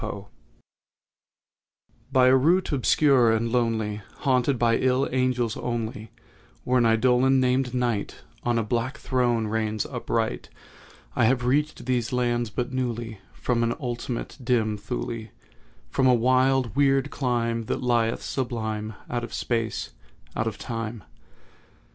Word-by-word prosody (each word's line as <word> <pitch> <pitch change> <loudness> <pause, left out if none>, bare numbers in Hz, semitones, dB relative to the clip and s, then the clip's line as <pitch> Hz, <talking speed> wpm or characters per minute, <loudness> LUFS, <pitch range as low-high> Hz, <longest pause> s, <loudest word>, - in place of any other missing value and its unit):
DREAM - - -3
LAND - - -9 1.9
By 130 -1 +5
a 130 - +6
route 165 +8 +3
obscure 135 -3 +4
and 115 +1 0
lonely, 110 -3 0 0.2
Haunted 130 -1 +2
by 115 -1 +3
ill 130 +1 +2
angels 125 -3 0
only, 115 -2 -4 0.5
Where 125 0 +2
an 120 - +4
Eidolon, 125 +4 +4
named 130 0 +1
NIGHT, 120 -5 -2 0.2
On 120 -1 0
a 115 - +1
black 120 +6 -2
throne 120 -5 0
reigns 110 0 -1
upright, 115 -3 -2 0.7
I 120 - +3
have 125 +1 +2
reached 150 +3 0
these 125 -2 0
lands 120 -2 0
but 125 +3 -3
newly 120 -4 -3
From 120 -2 -1
an 115 0 +1
ultimate 120 0 -4
dim 115 -4 +1
Thule— 105 - -5 0.6
From 130 - +2
a 125 - +6
wild 130 -1 +2
weird 140 0 +2
clime 115 -3 -1
that - - -3
lieth, 115 -2 +1
sublime, 110 -4 -3
Out 120 -1 -3
of 120 - -6
SPACE—out 115 - -4
of 110 - -3
TIME. 115 -3 -5
120 Hz, 135 wpm, -25 LUFS, 115-130 Hz, 1.9 s, a